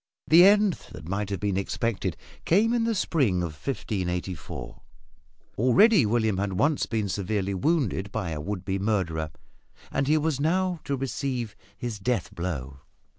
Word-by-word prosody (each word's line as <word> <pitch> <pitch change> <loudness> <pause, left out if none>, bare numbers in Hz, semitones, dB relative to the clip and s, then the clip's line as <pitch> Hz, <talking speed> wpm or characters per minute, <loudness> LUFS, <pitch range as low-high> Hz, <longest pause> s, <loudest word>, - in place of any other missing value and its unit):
The 170 +3 +8
end 205 -1 +5 0.2
that 80 - -9
might 100 +2 -2
have 100 -2 -2
been 100 0 0
expected 110 +2 -2 0.3
came 215 +7 +3
in 235 -1 +1
the 230 -1 +1
spring 125 - +1
of 85 -3 -4
1584. 90 - -4 0.8
Already 145 - +5
William 110 -3 +1
had 100 -1 -1
once 145 +10 +1
been 110 -3 -1
severely 100 +1 -1
wounded 105 - 0
by 100 -6 -3
a 75 -1 -3
would 95 +2 -4
be 95 0 -1
murderer, 90 -7 -1 0.6
and 135 0 0
he 155 +2 +4
was 155 -2 0
now 180 +3 +1
to 140 - -1
receive 130 -3 -3 0.2
his 115 -4 -4
death 115 -2 -1
blow. 70 -6 -4
110 Hz, 155 wpm, -26 LUFS, 95-150 Hz, 0.8 s, The